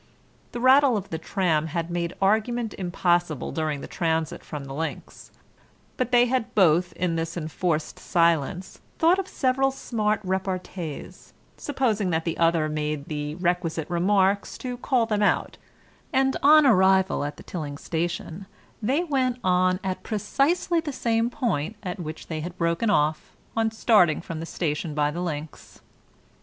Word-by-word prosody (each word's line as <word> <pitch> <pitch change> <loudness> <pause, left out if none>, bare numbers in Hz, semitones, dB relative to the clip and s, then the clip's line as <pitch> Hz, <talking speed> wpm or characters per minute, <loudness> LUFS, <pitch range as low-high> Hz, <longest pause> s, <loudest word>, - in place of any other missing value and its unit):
The 240 - -5
rattle 260 -1 +5
of 195 -1 -6
the 160 - -3
tram 160 -3 0
had 165 +2 -3
made 170 0 -2
argument 220 +3 +1
impossible 175 -4 0
during 155 -3 -2
the - - -7
transit 160 -1 -1
from 150 -3 -7
the 135 - -7
links, 160 +3 -6 0.7
but 255 -1 -2
they 245 0 +6
had 245 -1 -2
both 175 -2 +4
in 170 -2 -1
this 165 +1 -3
enforced 160 0 -2
silence 170 0 0 0.2
thought 340 +4 +4
of 385 - -3
several 270 -2 +1
smart 215 -5 -1
repartees, 185 -4 -5 0.2
supposing 230 -9 -1
that 165 -1 -1
the 165 - -1
other 165 -2 +3
made 150 -1 -3
the 150 -1 -3
requisite 175 -2 -1
remarks 195 +3 +2
to 250 -1 -5
call 245 -1 +1
them 210 -2 -1
out, 205 - +1 0.5
and 265 0 +2
on 305 +1 +7
arrival 190 - +4
at 145 0 -5
the - - -12
Tilling 150 -5 -5
station 170 +3 -4 0.3
they 270 +10 +1
went 260 -6 0
on 185 0 +2
at 185 -1 -3
precisely 280 - 0
the 320 -2 -4
same 230 -2 0
point 225 - -2
at 180 0 -5
which 160 -2 -6
they 160 -2 -4
had 175 +3 -6
broken 170 +6 0
off 155 -5 +1 0.2
on 225 0 +2
starting 210 -7 +3
from 165 -1 -6
the 165 - -6
station 155 -2 -3
by 150 -1 +1
the 175 - -4
links. 155 -3 -6
180 Hz, 155 wpm, -25 LUFS, 160-230 Hz, 0.7 s, on